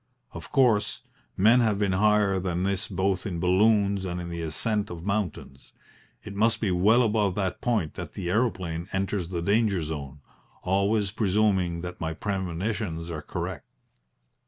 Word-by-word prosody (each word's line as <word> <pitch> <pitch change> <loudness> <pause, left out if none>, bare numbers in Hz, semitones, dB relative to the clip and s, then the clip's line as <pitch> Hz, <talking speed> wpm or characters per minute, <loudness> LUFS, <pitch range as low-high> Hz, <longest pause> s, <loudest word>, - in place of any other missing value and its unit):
Of - - -9
course, 120 -6 +2 0.4
men 110 +6 +6
have 110 -4 +2
been 100 -1 +1
higher 100 0 +3
than 90 -1 -2
this 100 +1 -1
both 95 +1 -1
in 90 -4 -3
balloons 100 +2 +3
and 90 -1 -3
in 85 -1 -5
the 85 0 -5
ascent 100 +7 -1
of 85 0 -8
mountains. 100 -9 -4 0.5
It 105 - -8
must 110 +3 +2
be 105 -4 0
well 105 +8 +4
above 105 -4 +1
that 95 -3 -2
point 110 -10 0
that - - -7
the 90 - -5
aeroplane 90 -5 -1
enters 95 -2 -1
the 85 -2 -3
danger 100 -2 +2
zone 75 -2 -6 0.4
always 100 +2 +1
presuming 95 -4 +1
that 90 0 -7
my 80 0 -2
premonitions 95 -2 -3
are 80 -2 -4
correct. - - -5
95 Hz, 155 wpm, -26 LUFS, 85-105 Hz, 0.5 s, men